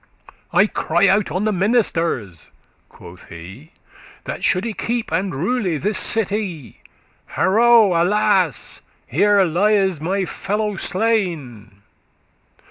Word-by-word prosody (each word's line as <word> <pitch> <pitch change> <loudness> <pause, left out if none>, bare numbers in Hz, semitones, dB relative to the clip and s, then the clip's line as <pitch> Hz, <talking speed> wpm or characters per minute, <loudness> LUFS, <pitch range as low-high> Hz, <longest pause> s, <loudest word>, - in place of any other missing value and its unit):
I - - +4
cry - - +1
out 210 -4 +2
on 185 +6 -2
the 215 - +1
ministers,' 170 - -1 0.4
quoth 85 +1 -15
he. 95 - -12 0.5
'That - - -6
shoulde 205 +4 0
keep 235 -4 -3
and 185 +1 -1
rule 185 - -1
this 205 +4 -1
city; 200 - -3 0.5
Harow! 220 0 +4
alas! 185 - 0 0.2
here 200 +8 +3
lies 190 -1 +1
my 190 +4 -1
fellow 210 +3 -3
slain. 165 - -2
190 Hz, 105 wpm, -20 LUFS, 160-210 Hz, 0.5 s, I